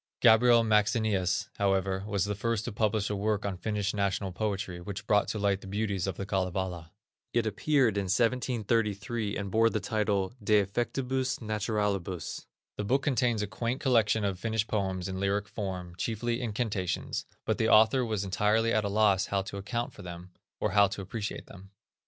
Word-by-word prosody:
Gabriel 115 +1 +6
Maxenius, 105 -3 +2
however, 95 -1 +1
was 100 -3 0
the 105 - -1
first 110 +1 -1
to 120 - -3
publish 105 -1 0
a - - -1
work 105 +1 -1
on 100 -2 -2
Finnish 105 +2 -2
national 100 -1 -1
poetry, 95 -2 -3
which 100 +2 -6
brought 105 -1 +3
to - - -3
light 100 -1 +1
the - - -10
beauties 100 -2 -1
of 95 - -3
the 100 - -4
Kalevala. 90 -3 -2 0.4
It 120 -1 +2
appeared 115 +1 +2
in 100 - 0
1733, 115 -1 0
and 100 -1 -4
bore 115 +2 +4
the 110 - -1
title: 105 -1 0
De 105 +1 +3
Effectibus 130 +5 -1
Naturalibus. 105 -5 -2 0.3
The 105 - -2
book 135 +6 +1
contains 120 -5 +1
a - - -2
quaint 115 +5 -3
collection 115 -5 +3
of 95 -2 -2
Finnish 110 0 0
poems 95 -4 -2
in 95 0 -4
lyric 100 +1 0
forms, 90 -4 -5
chiefly 115 +3 -1
incantations; 105 -5 -2 0.2
but - - 0
the 110 - +2
author 110 +4 +6
was 110 -4 -1
entirely 105 +4 +2
at 110 - +2
a 100 - -1
loss 100 -2 +3
how 100 -1 0
to 100 - -7
account 115 +5 -3
for - - -12
them, 90 0 -9 0.3
or - - 0
how 100 -1 +5
to 100 +1 -5
appreciate 105 +2 -5
them. 100 0 -13
105 Hz, 180 wpm, -29 LUFS, 95-110 Hz, 0.4 s, Gabriel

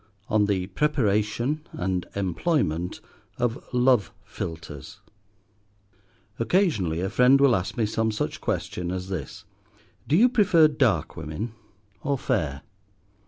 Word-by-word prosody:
ON 105 -2 +3
THE 95 -3 0
PREPARATION 120 +3 0
AND 90 -1 -2
EMPLOYMENT 95 - -1 0.4
OF 120 0 -1
LOVE 125 -3 +3
PHILTRES 80 -4 -7 1.4
OCCASIONALLY 115 - +1
a 95 - -1
friend 125 +6 +5
will 135 -4 +5
ask 95 0 -3
me 115 - +2
some 110 +1 0
such 105 - -3
question 90 -1 -2
as 95 +1 -4
this, 100 +1 -6 0.6
Do 150 - +2
you 235 +6 +7
prefer 200 -10 +5
dark 115 - +1
women 80 +8 -5 0.5
or 140 0 0
fair? 80 - -1
105 Hz, 115 wpm, -25 LUFS, 90-135 Hz, 1.4 s, you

